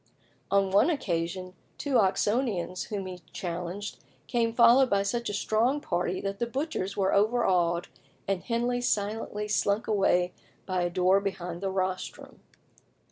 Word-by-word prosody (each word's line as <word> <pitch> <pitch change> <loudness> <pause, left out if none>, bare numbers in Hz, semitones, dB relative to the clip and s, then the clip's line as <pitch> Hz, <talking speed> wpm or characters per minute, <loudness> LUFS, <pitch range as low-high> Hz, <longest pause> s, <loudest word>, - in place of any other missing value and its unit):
On 195 -1 +2
one 200 - +5
occasion 185 - -2 0.2
two 275 -4 +1
Oxonians 195 -2 0
whom 200 -3 -4
he 180 -1 -7
challenged 180 +3 -5 0.3
came 230 -2 +1
followed 240 +3 +6
by 200 0 +2
such 235 +4 -2
a - - -3
strong 230 +7 +1
party 180 -5 -1
that 195 0 -4
the 235 - 0
butchers 260 - -3
were 195 -1 +2
overawed, 185 -6 +2 0.4
and 195 -2 0
Henley 245 +1 -1
silently 210 -2 -1
slunk 205 0 +1
away 180 -4 +2 0.3
by 185 -1 -1
a 175 - +1
door 185 +2 +3
behind 180 -3 -4
the 195 - -1
rostrum. 185 -1 -3
200 Hz, 140 wpm, -28 LUFS, 185-230 Hz, 0.4 s, followed